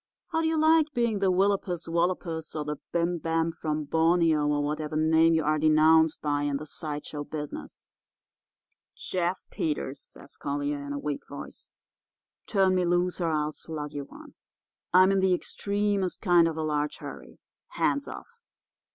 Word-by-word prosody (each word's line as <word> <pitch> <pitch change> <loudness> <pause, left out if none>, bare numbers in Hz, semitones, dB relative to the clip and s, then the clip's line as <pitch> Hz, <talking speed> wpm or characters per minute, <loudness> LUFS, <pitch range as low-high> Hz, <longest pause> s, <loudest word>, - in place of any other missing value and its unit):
How 325 - 0
do 320 - +1
you 320 0 +1
like 315 0 +4
being 235 -4 +1
the 195 -1 +2
willopus 190 -2 0
wallopus 165 -2 -1
or 150 -1 -3
the 150 0 -3
bim 170 0 0
bam 165 +1 0
from 155 -2 -3
Borneo, 160 0 +2
or 145 0 +1
whatever 150 +1 -3
name 160 +1 +4
you 160 - +1
are 155 +1 +1
denounced 155 +1 +4
by 145 -1 0
in 145 -1 0
the 155 - -7
side 150 -1 -5
show 145 -1 -5
business?' 150 0 -7 1.1
"'Jeff 180 0 -2
Peters,' 145 -3 -2
says - - -11
Collier, 145 0 -3
in 140 - -6
a - - -3
weak 145 0 -4
voice. - - -9 0.8
'Turn 195 -3 +3
me 185 -1 +2
loose, 175 +1 +1
or 170 - +1
I'll 150 -1 0
slug 150 -2 -6
you 145 -1 -5
one. - - -14 0.6
I'm 185 +2 +6
in 195 - +2
the 190 -1 +3
extremest 200 0 -1
kind 175 -4 +4
of 160 -1 -3
a 160 - -1
large 150 -1 -1
hurry. - - -10 0.3
Hands 285 0 0
off! 475 0 -10
160 Hz, 170 wpm, -27 LUFS, 150-185 Hz, 1.1 s, I'm